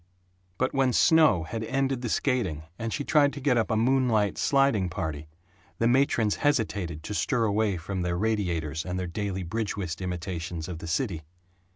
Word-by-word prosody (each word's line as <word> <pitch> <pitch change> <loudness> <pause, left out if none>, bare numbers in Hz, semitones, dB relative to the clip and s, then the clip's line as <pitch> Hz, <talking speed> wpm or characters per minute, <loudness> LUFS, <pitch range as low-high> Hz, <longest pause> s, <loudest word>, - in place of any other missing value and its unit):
But 130 - 0
when 135 -2 +2
snow 155 - +5
had 110 +7 -5
ended 135 +1 -1
the 120 - -3
skating 105 - 0 0.2
and 115 0 -3
she 145 - -2
tried 145 -1 +3
to 145 - -6
get 135 -2 +2
up 115 -2 +1
a 110 - +1
moonlight 115 -3 +2
sliding 135 -10 +2
party, 80 -4 -4 0.5
the 115 - +2
matrons 120 -4 +2
hesitated 100 - -1
to 105 - -5
stir 110 - +1
away 105 -2 +1
from 95 +3 -4
their 90 0 -1
radiators 85 -7 -1
and 90 0 -4
their 90 - -2
daily 95 +1 -3
bridge 105 +5 -3
whist 90 -3 -4
imitations 90 -2 -4
of 85 -3 -6
the 85 - -7
city. 85 - -1
105 Hz, 180 wpm, -27 LUFS, 85-125 Hz, 0.5 s, snow